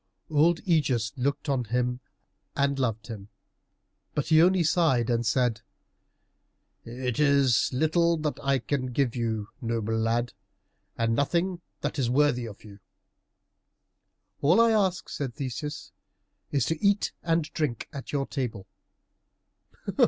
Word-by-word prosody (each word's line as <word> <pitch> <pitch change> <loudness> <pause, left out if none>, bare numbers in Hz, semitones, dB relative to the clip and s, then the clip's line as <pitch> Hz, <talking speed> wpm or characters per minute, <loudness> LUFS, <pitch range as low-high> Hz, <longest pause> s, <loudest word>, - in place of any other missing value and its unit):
Old 160 +3 +3
Ægeus 130 - +1
looked 140 +3 -2
on 135 -4 0
him 125 +2 -1 0.6
and 140 0 +1
loved 115 -4 -1
him, 105 -4 -8 0.9
but 150 - -1
he 160 -1 +6
only 180 +1 +4
sighed 140 -8 +2
and 120 0 +1
said, 120 -1 +1 1.2
"It 125 +1 -4
is 140 -5 +3
little 165 +5 +2
that 150 -1 -3
I 140 -1 +2
can 130 +1 -2
give 130 -2 +1
you, 110 -3 -2
noble 115 -2 -1
lad, 115 +2 0 0.6
and 115 0 +1
nothing 170 +6 0 0.2
that 150 - -2
is 125 -3 +1
worthy 125 -2 +2
of 105 - -11
you." 105 -2 -13 1.6
"All 170 +9 +4
I 230 0 +5
ask," 190 -7 +1
said 135 -5 -4
Theseus, 140 +3 -5 0.6
"is 140 -4 +1
to 160 +2 -2
eat 200 0 +3
and 165 -1 +1
drink 145 -8 -2
at 140 -2 -7
your 140 -2 0
table." 120 -10 -4
135 Hz, 130 wpm, -27 LUFS, 115-155 Hz, 1.6 s, he